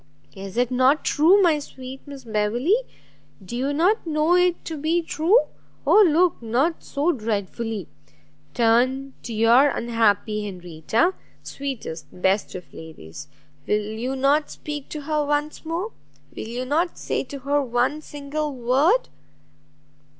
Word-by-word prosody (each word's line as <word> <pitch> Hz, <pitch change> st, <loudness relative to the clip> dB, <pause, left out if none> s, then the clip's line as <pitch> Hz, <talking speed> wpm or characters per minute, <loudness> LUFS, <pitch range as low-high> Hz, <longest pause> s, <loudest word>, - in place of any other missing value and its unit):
Is 195 Hz, +1 st, -8 dB
it 245 Hz, 0 st, +1 dB
not 260 Hz, +4 st, +3 dB
true, 340 Hz, +7 st, +5 dB
my 320 Hz, -4 st, +4 dB
sweet 265 Hz, -2 st, -9 dB
Miss 280 Hz, -2 st, -9 dB
Beverley? 225 Hz, -, 0 dB, 0.7 s
do 210 Hz, -, -6 dB
you 265 Hz, +3 st, -1 dB
not 350 Hz, +7 st, +1 dB
know 310 Hz, +2 st, +2 dB
it 360 Hz, -1 st, +2 dB
to 325 Hz, -, -4 dB
be 320 Hz, +3 st, 0 dB
true? 335 Hz, +9 st, +3 dB, 0.4 s
Oh 430 Hz, -, +6 dB
look 335 Hz, 0 st, +2 dB
not 260 Hz, +9 st, 0 dB
so 295 Hz, +4 st, 0 dB
dreadfully! 220 Hz, -, -3 dB, 0.7 s
turn 255 Hz, +4 st, +2 dB
to 240 Hz, -, -7 dB
your 230 Hz, +6 st, +5 dB
unhappy 220 Hz, -3 st, +1 dB
Henrietta; 180 Hz, -, -1 dB, 0.3 s
sweetest, 225 Hz, -, -6 dB
best 190 Hz, +2 st, 0 dB
of 180 Hz, -1 st, -9 dB
ladies! 145 Hz, -, -10 dB, 0.4 s
will 210 Hz, -, +2 dB
you 245 Hz, +4 st, -3 dB
not 280 Hz, +3 st, +2 dB
speak 295 Hz, -2 st, -7 dB
to 305 Hz, -, -5 dB
her 300 Hz, +1 st, 0 dB
once 295 Hz, +1 st, -2 dB
more? 345 Hz, +7 st, -3 dB, 0.4 s
will -, -, -6 dB
you 245 Hz, +3 st, -4 dB
not 325 Hz, +6 st, 0 dB
say -, -, -2 dB
to 280 Hz, -, -7 dB
her 285 Hz, +2 st, +1 dB
one 255 Hz, +4 st, 0 dB
single 295 Hz, 0 st, -4 dB
word?" 270 Hz, -, +2 dB
270 Hz, 140 wpm, -23 LUFS, 225-305 Hz, 0.7 s, Oh